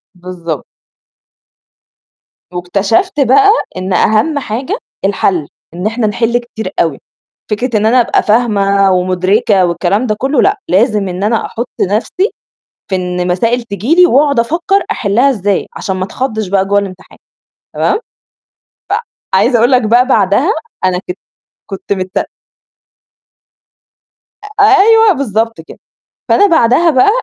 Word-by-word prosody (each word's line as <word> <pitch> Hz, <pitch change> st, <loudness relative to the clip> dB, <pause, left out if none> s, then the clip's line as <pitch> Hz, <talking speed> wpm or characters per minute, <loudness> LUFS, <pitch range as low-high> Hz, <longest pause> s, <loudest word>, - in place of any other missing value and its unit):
بالضبط. 175 Hz, -4 st, -6 dB, 1.9 s
واكتشفت 200 Hz, -, -1 dB
بقى 280 Hz, -, +5 dB, 0.3 s
إن 185 Hz, 0 st, -3 dB
أهَم 220 Hz, -, +2 dB
حاجة 265 Hz, -, -4 dB, 0.3 s
الحَل، 185 Hz, -6 st, 0 dB, 0.3 s
إن 180 Hz, +3 st, -6 dB
إحنا 225 Hz, 0 st, -1 dB
نحِل 230 Hz, +3 st, 0 dB
كتير 220 Hz, -5 st, -6 dB
أوي. 160 Hz, -5 st, -1 dB, 0.5 s
فكرة 230 Hz, +1 st, -1 dB
إن 210 Hz, -, 0 dB
أنا 245 Hz, +2 st, +4 dB
أبقى -, -, +1 dB
فاهمة 200 Hz, -4 st, +2 dB
ومدركة 185 Hz, +2 st, +1 dB
والكلام 175 Hz, +7 st, 0 dB
ده 215 Hz, -, 0 dB
كلّه 275 Hz, +3 st, +1 dB
لأ، 400 Hz, +1 st, +1 dB
لازم 210 Hz, 0 st, +2 dB
إن 180 Hz, +2 st, -4 dB
أنا 220 Hz, +1 st, 0 dB
أحُط 235 Hz, +2 st, -5 dB
نَفْسي 225 Hz, -, 0 dB, 0.6 s
في 190 Hz, -, +1 dB
إن 180 Hz, 0 st, -3 dB
مسائل 230 Hz, +7 st, 0 dB
تيجي 230 Hz, -, -1 dB
لي 360 Hz, 0 st, +6 dB
وأقعد 280 Hz, -4 st, +3 dB
أفكّر 350 Hz, -, 0 dB
أحلّها 245 Hz, -, +1 dB
إزاي 205 Hz, -5 st, -1 dB
عشان 190 Hz, -1 st, -3 dB
ما 185 Hz, -, -2 dB
أتخضّش 220 Hz, -2 st, -4 dB
بقى 195 Hz, 0 st, +1 dB
جوّه 200 Hz, +1 st, +2 dB
الامتحان 190 Hz, -2 st, -7 dB, 0.6 s
تمام؟ -, -, 0 dB, 1.3 s
فعايزة 240 Hz, -, +3 dB
أقول 240 Hz, +4 st, +3 dB
لك 250 Hz, -1 st, +4 dB
بقى 240 Hz, +4 st, +3 dB
بَعدها 245 Hz, -, +2 dB, 0.3 s
أنا 180 Hz, -1 st, +1 dB
كنت 180 Hz, -, -5 dB, 0.5 s
كنت 195 Hz, +1 st, -4 dB
مت 185 Hz, 0 st, -3 dB, 2.3 s
أ -, -, +6 dB
أيوه، 425 Hz, +1 st, +5 dB
بالضبط 225 Hz, -6 st, -2 dB
كده. -, -, -14 dB, 0.5 s
فأنا 410 Hz, -, +4 dB
بَعدها 325 Hz, 0 st, +3 dB
بقى 260 Hz, +8 st, +4 dB
215 Hz, 130 wpm, -13 LUFS, 190-260 Hz, 2.3 s, لي